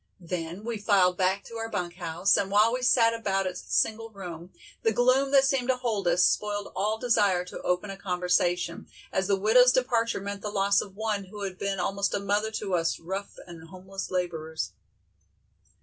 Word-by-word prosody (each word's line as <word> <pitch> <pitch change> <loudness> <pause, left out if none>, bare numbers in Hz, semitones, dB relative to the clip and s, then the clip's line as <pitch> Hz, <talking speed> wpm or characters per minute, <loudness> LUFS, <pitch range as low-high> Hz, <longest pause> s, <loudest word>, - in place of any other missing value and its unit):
Then 175 +1 -5
we 230 -2 -3
filed 195 -4 +3
back 190 +1 +1
to 230 - -9
our 225 0 -4
bunk 180 -4 -4
house, 175 +2 +1
and 195 - 0
while 210 +3 +4
we 255 - -2
sat 235 -2 +4
about 195 -4 -1
its 185 -1 -4
single 225 +1 0
room, 180 -4 -9 0.3
the 225 - +2
gloom 255 +4 +3
that 275 -1 +5
seemed 270 -2 +1
to 260 - +3
hold 225 -7 -2
us, 175 +1 +4
spoiled 205 -1 0
all 210 +3 0
desire 205 -7 +2
to 180 - -8
open 180 +3 -1
a 195 - -8
conversation, 180 -2 0 0.3
as 190 0 0
the 200 - +3
widow's 235 +6 +5
departure 235 -3 +1
meant 200 0 -6
the 210 - -4
loss 200 -1 +2
of 195 -2 -10
one 210 -2 -2
who 205 +2 -8
had 190 -2 -5
been 200 -1 -2
almost 195 +2 -1
a - - 0
mother 205 +2 0
to 210 -3 -4
us 165 -2 0
rough 190 +4 -6
and 165 -2 -11
homeless 190 +2 -7
laborers. 160 -3 -3
200 Hz, 195 wpm, -27 LUFS, 180-220 Hz, 0.3 s, that